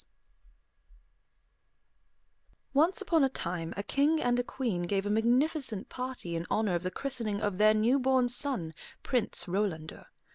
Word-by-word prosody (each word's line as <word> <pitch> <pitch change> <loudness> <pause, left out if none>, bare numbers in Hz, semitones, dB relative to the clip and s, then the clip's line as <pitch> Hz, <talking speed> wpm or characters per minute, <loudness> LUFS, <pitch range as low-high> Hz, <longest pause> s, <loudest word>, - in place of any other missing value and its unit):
] - - -19 2.7
Once 325 +8 +3
upon 335 -6 +2
a 270 - +3
time 170 -8 -4
a 200 - -2
king 295 +7 +2
and 245 -2 +1
a - - +1
queen 235 -8 -3
gave 195 +3 -1
a 205 - -1
magnificent 245 +1 +1
party 250 -9 -5
in 165 - -2
honor 215 -3 +1
of 175 - 0
the 185 - -2
christening 230 -3 -3
of 205 -3 -2
their 215 0 +5
new 235 +6 +3
born 260 -1 +2
son, 245 - +1 0.3
Prince 250 -4 +1
Rolandor. 175 -4 -3
230 Hz, 150 wpm, -30 LUFS, 195-265 Hz, 2.7 s, their